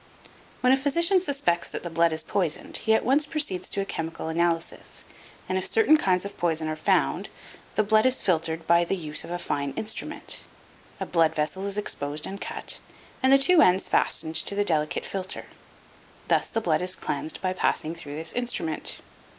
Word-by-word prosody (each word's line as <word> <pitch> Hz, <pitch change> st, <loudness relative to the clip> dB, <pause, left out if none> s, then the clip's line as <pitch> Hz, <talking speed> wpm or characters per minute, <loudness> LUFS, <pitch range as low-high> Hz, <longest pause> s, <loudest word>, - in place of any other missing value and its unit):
When 255 Hz, +1 st, +5 dB
a -, -, +4 dB
physician 335 Hz, +7 st, +3 dB
suspects 275 Hz, -, +1 dB
that -, -, -6 dB
the 175 Hz, -, -4 dB
blood 165 Hz, 0 st, +3 dB
is 160 Hz, 0 st, 0 dB
poisoned 170 Hz, -2 st, -1 dB
he 220 Hz, -, +2 dB
at -, -, 0 dB
once 285 Hz, +4 st, +3 dB
proceeds 295 Hz, -, 0 dB
to 200 Hz, -, -1 dB
a -, -, -3 dB
chemical 165 Hz, -3 st, -4 dB
analysis, 165 Hz, 0 st, -1 dB, 0.4 s
and 185 Hz, -, 0 dB
if 185 Hz, -, -1 dB
certain 440 Hz, -8 st, +5 dB
kinds 185 Hz, -10 st, +2 dB
of 200 Hz, -, -8 dB
poison 160 Hz, -2 st, +1 dB
are 155 Hz, -, -2 dB
found, 70 Hz, -, +1 dB, 0.5 s
the 215 Hz, -, +3 dB
blood 215 Hz, +3 st, +4 dB
is 255 Hz, 0 st, +3 dB
filtered 165 Hz, -2 st, -1 dB
by 170 Hz, +1 st, +4 dB
the 175 Hz, -, -1 dB
use 155 Hz, -4 st, -3 dB
of -, -, -9 dB
a 175 Hz, -, -2 dB
fine 140 Hz, -5 st, -3 dB
instrument. 220 Hz, +7 st, -4 dB, 0.6 s
A -, -, -2 dB
blood 165 Hz, -2 st, +2 dB
vessel 160 Hz, +6 st, -2 dB
is 200 Hz, 0 st, 0 dB
exposed 150 Hz, -7 st, -2 dB
and 195 Hz, +1 st, -7 dB
cut, -, -, -5 dB, 0.4 s
and 260 Hz, 0 st, +4 dB
the 275 Hz, -, +8 dB
two 325 Hz, +5 st, +5 dB
ends 185 Hz, -4 st, +4 dB
fastened 160 Hz, 0 st, 0 dB
to 200 Hz, -, +1 dB
the 205 Hz, 0 st, +1 dB
delicate 155 Hz, -4 st, 0 dB
filter. 190 Hz, -1 st, -4 dB, 0.8 s
Thus -, -, +3 dB
the 225 Hz, -, -2 dB
blood 165 Hz, -6 st, +1 dB
is 180 Hz, 0 st, 0 dB
cleansed 150 Hz, +2 st, -4 dB
by 185 Hz, -1 st, -1 dB
passing 165 Hz, -3 st, 0 dB
through 150 Hz, -4 st, -8 dB
this 160 Hz, +1 st, -1 dB
instrument. 175 Hz, -11 st, -1 dB
180 Hz, 190 wpm, -26 LUFS, 160-220 Hz, 0.8 s, the